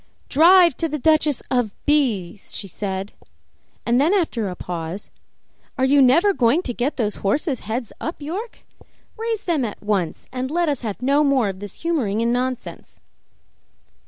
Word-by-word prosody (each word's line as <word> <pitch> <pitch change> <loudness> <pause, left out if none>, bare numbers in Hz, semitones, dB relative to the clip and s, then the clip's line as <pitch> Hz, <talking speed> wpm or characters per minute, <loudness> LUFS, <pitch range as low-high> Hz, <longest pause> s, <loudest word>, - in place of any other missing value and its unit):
"Drive 340 +1 +6
to 330 - -1
the 300 - -2
Duchess 305 -1 +2
of 245 -6 0
B 240 -12 +1
's," 200 - -9
she 200 - -4
said, 195 +1 -4 0.7
and 240 +3 +3
then 335 +8 +3
after 245 - 0
a 180 - -6
pause, 175 +2 -6 0.7
"Are 260 - +2
you 280 +1 +5
never 335 +11 +5
going 265 +4 +2
to 245 - -2
get 250 +5 -2
those 215 -4 -1
horses' 265 - -1
heads 230 0 -3
up, 325 - -4
York? 370 +11 -6 0.5
Raise 450 -1 -3
them 325 -7 +1
at 215 -3 -5
once 195 -6 -2
and 255 0 -3
let 340 +1 +1
us 285 -4 -1
have 225 0 -5
no 280 +3 +3
more 270 -7 +2
of 190 -1 -6
this 205 - -9
humoring 260 -12 0
and 235 +1 +1
nonsense." 255 0 -4
255 Hz, 170 wpm, -22 LUFS, 210-310 Hz, 0.7 s, Drive